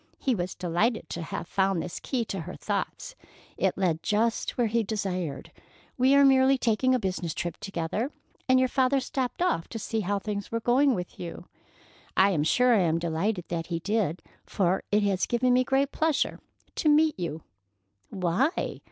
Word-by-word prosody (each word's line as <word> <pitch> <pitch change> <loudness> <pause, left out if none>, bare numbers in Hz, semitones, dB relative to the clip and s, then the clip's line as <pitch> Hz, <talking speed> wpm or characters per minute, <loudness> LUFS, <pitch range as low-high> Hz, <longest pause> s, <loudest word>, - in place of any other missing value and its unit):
He 265 - 0
was 180 -4 -3
delighted 180 +7 0
to 170 - -4
have 165 - -5
found 195 -2 +1
this 170 - -5
key 245 -4 -2
to 195 - -4
her 160 - -7
thoughts. - - -4 0.4
It - - 0
led 170 -4 0
just 225 +2 0
where 240 - +3
he 230 +1 +1
desired. 185 -8 -3 0.4
"We 260 +2 +4
are 280 0 +7
merely 265 0 +5
taking 255 +2 +2
a - - +1
business 185 -5 -3
trip 175 -1 -3
together, 195 - -3 0.4
and 260 - +6
your 255 0 +4
father 265 +1 +2
stopped 260 +4 -2
off 165 - 0
to 230 - -6
see 225 +1 -2
how 205 0 0
things 205 0 -4
were 230 - 0
going 255 +3 +3
with 180 -2 -6
you. 175 0 -7 0.7
I 195 +1 +5
am 160 -6 +1
sure 250 +10 +4
I 220 - +4
am 165 -2 +2
delighted 170 +3 -1
that 165 -1 -3
he 170 - -2
did, 185 -2 -1 0.2
for 185 -2 0
it 210 0 +3
has 195 -2 +1
given 245 +1 +2
me 255 +1 +4
great 270 +2 +1
pleasure 315 -2 0 0.4
to 310 - +2
meet 305 -4 +4
you." 165 -3 -4 0.7
"Why?" 190 - -1
210 Hz, 185 wpm, -27 LUFS, 175-255 Hz, 0.7 s, are